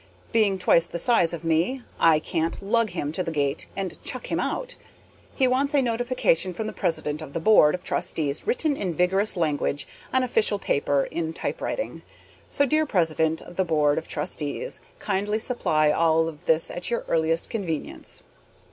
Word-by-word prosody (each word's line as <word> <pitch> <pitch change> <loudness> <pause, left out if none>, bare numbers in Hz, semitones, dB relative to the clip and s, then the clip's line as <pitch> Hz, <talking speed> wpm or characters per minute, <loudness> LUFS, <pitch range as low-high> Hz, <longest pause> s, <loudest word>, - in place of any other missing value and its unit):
Being 215 -4 +3
twice 170 -2 +3
the - - -5
size 175 -3 +3
of 170 -1 -5
me, 170 +11 0 0.2
I 165 -2 +6
can't 165 +3 -2
lug 225 +2 +2
him 160 -5 -3
to 165 - -3
the 175 - -2
gate 145 -2 -1
and 195 -2 -4
chuck - - -4
him - - 0
out. - - -2 0.6
He 265 - +3
wants 275 +3 +1
a 280 - +5
notification 235 -7 +1
from 215 +5 -4
the 215 - -4
president 150 -2 -2
of 140 - -9
the - - -2
board 165 -4 +5
of 180 - -9
trustees 150 - -1
written 330 - +1
in 185 -9 -2
vigorous 190 +4 +3
language 145 -3 -1 0.2
on 260 0 +2
official 225 -4 +2
paper 140 -6 +1
in 160 -1 -3
typewriting. - - -4 0.5
So, 285 - +3
dear 310 +2 +1
president 160 -4 +1
of 175 - -13
the 190 - +3
board 150 -4 +2
of 160 - -12
trustees, 150 - -3 0.2
kindly 205 +1 -1
supply 155 -11 +1
all 160 0 +3
of 155 -2 -9
this 160 0 +2
at 175 - -4
your 235 - 0
earliest 165 0 0
convenience. 180 - -4
175 Hz, 175 wpm, -25 LUFS, 160-225 Hz, 0.6 s, I